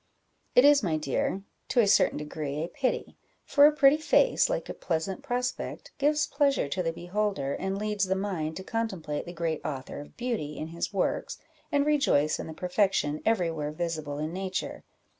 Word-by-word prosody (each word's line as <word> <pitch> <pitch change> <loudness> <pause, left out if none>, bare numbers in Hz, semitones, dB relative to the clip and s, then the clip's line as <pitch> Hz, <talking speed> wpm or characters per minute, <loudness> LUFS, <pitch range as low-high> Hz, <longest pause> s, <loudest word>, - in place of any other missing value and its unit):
"It 250 - +7
is, 290 -1 +7
my 165 -7 0
dear, 155 +6 -1 0.2
to 250 - +1
a 230 - +6
certain 200 - +4
degree 150 0 -4
a - - -3
pity; 255 +7 -2 0.3
for 290 0 +6
a - - +5
pretty 295 -1 +5
face, 475 +12 +3
like - - -2
a - - -5
pleasant 175 +8 -2
prospect, 250 -2 -3
gives 295 +1 +3
pleasure 280 - +1
to 185 +6 -1
the 165 -2 0
beholder, 175 -4 -2
and 190 +1 -2
leads 210 -1 0
the 190 0 0
mind 180 -6 -2
to 190 - -6
contemplate 190 -11 -3
the - - -5
great 165 -2 -2
Author 135 -2 -5
of 145 - -12
beauty 230 -12 -3
in 155 - -5
his 170 +4 -3
works, 195 -2 -1 0.3
and 285 0 +2
rejoice 275 - +2
in - - -5
the 160 - -7
perfection 180 -5 +1
every 185 -7 +2
where 150 -2 -3
visible 155 -3 -3
in 155 +2 -3
nature. 190 0 -4
190 Hz, 185 wpm, -28 LUFS, 155-250 Hz, 0.3 s, It